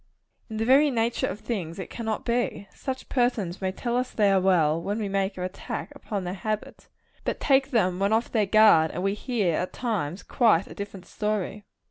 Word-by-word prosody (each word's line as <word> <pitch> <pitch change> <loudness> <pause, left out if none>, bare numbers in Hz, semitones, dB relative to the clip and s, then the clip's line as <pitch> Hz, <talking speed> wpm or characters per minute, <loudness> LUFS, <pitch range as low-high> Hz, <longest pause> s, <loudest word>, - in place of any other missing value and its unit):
In 220 - -5
the 225 - 0
very 275 +4 +6
nature 235 -2 0
of 205 +3 -5
things 190 -8 -4
it 190 - -7
cannot 220 -2 -3
be. 235 -4 -1
Such 260 -1 -5
persons 225 -9 0
may 190 -1 0
tell 235 +5 -3
us 250 0 0
they 205 -2 +2
are 190 -1 +4
well, 165 -4 +3
when 200 +5 -2
we 215 -2 -2
make 195 0 -1
an 180 - -3
attack 185 +1 -5
upon 205 -4 -4
their 180 0 -3
habits; 215 +2 -4 0.4
but - - -2
take 270 -1 +3
them 185 -8 +1
when 200 +1 +1
off 225 +2 +1
their 215 -4 +2
guard, 210 -7 +6
and 180 - -4
we 195 0 +1
hear, 210 -5 0
at 180 - -3
times, 200 - -2
quite 215 -7 +3
a - - -11
different 200 -2 -7
story. 210 0 -3
205 Hz, 205 wpm, -26 LUFS, 185-230 Hz, 0.4 s, very